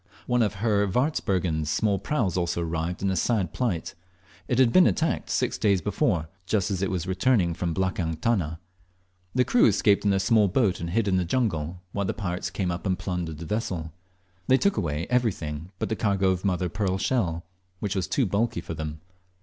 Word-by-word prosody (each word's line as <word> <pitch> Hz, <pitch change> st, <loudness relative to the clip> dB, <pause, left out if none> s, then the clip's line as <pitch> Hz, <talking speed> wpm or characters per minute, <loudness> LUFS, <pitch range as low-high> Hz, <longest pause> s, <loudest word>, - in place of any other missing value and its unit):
One 125 Hz, -1 st, +2 dB
of 105 Hz, -2 st, +1 dB
Herr 105 Hz, 0 st, +1 dB
Warzbergen's 95 Hz, -, 0 dB
small 100 Hz, +6 st, +1 dB
praus 105 Hz, -, -1 dB
also 85 Hz, -1 st, 0 dB
arrived 85 Hz, +2 st, -3 dB
in 100 Hz, -, +2 dB
a -, -, 0 dB
sad 95 Hz, -2 st, 0 dB
plight. 110 Hz, -10 st, -2 dB, 0.5 s
It 125 Hz, -, 0 dB
had 130 Hz, -3 st, +4 dB
been 185 Hz, -1 st, +7 dB
attacked 165 Hz, -, 0 dB
six -, -, 0 dB
days 100 Hz, -3 st, +3 dB
before, 80 Hz, -1 st, 0 dB, 0.2 s
just 100 Hz, -1 st, +1 dB
as 95 Hz, -2 st, -1 dB
it 100 Hz, -, 0 dB
was 90 Hz, -3 st, -2 dB
returning, 95 Hz, -1 st, +2 dB
from 85 Hz, -1 st, -2 dB
the -, -, -3 dB
"blakang 90 Hz, -3 st, -1 dB
tana." 80 Hz, -7 st, 0 dB, 0.8 s
The 125 Hz, 0 st, +3 dB
crew 245 Hz, -, +5 dB
escaped 100 Hz, -2 st, +3 dB
in 105 Hz, -, +2 dB
their 100 Hz, -, +3 dB
small 105 Hz, +2 st, +4 dB
boat 100 Hz, -1 st, +1 dB
and 85 Hz, -, -4 dB
hid 105 Hz, +4 st, +1 dB
in 95 Hz, -1 st, +2 dB
the 90 Hz, -, +1 dB
jungle, 90 Hz, -5 st, -1 dB
while 100 Hz, 0 st, -2 dB
the -, -, -2 dB
pirates 90 Hz, -4 st, -3 dB
came 90 Hz, 0 st, -2 dB
up 85 Hz, +3 st, -4 dB
and 95 Hz, -1 st, +1 dB
plundered 90 Hz, -4 st, -3 dB
the 85 Hz, -, -7 dB
vessel. 85 Hz, -6 st, -3 dB, 0.5 s
They 130 Hz, -, +5 dB
took 200 Hz, +7 st, +2 dB
away 80 Hz, -3 st, -1 dB
everything 90 Hz, -10 st, -1 dB
but -, -, -3 dB
the 110 Hz, -, 0 dB
cargo 100 Hz, -3 st, +2 dB
of 95 Hz, -1 st, -2 dB
mother 90 Hz, -2 st, 0 dB
of 85 Hz, -, -5 dB
pearl 100 Hz, -3 st, 0 dB
shell, 90 Hz, -7 st, 0 dB, 0.3 s
which 100 Hz, -1 st, -2 dB
was 95 Hz, -, -1 dB
too 135 Hz, -, +1 dB
bulky 100 Hz, 0 st, 0 dB
for 85 Hz, -, -6 dB
them. 75 Hz, -1 st, -5 dB
95 Hz, 205 wpm, -26 LUFS, 85-110 Hz, 0.8 s, been